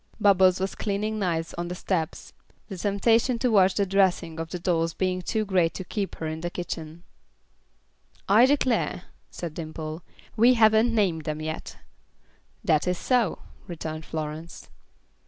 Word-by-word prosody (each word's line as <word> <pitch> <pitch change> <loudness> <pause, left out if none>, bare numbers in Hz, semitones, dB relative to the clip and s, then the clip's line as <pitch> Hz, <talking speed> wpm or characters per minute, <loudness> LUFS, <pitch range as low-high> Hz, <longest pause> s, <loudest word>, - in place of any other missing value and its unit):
Bubbles 190 -3 +5
was 190 +1 -2
cleaning 215 +1 -2
knives 165 -4 -1
on 175 - -2
the 180 - -5
steps, 170 -3 -3 0.4
the 195 - -5
temptation 225 +6 +2
to 250 0 +1
watch 190 -3 +4
the 200 - +2
dressing 185 -4 +1
of 165 0 -4
the 180 - -4
dolls 165 -2 0
being 185 -1 -1
too 215 +4 -1
great 180 -4 +1
to 185 - -4
keep 200 +1 -4
her 160 - -6
in 160 0 -4
the 175 - -2
kitchen. 170 -2 -6 1.2
"I 225 +6 +6
declare," 255 -9 +1 0.3
said 170 -3 -6
Dimple, 155 0 -6 0.3
"we 240 +3 +5
haven't 220 +1 +4
named 175 -8 +1
them 155 0 -3
yet." 155 0 -5 0.9
"That 155 +2 +2
is 180 0 +1
so," 240 -4 0 0.2
returned 160 -3 -6
Florence. 155 +1 -6
180 Hz, 155 wpm, -26 LUFS, 165-210 Hz, 1.2 s, I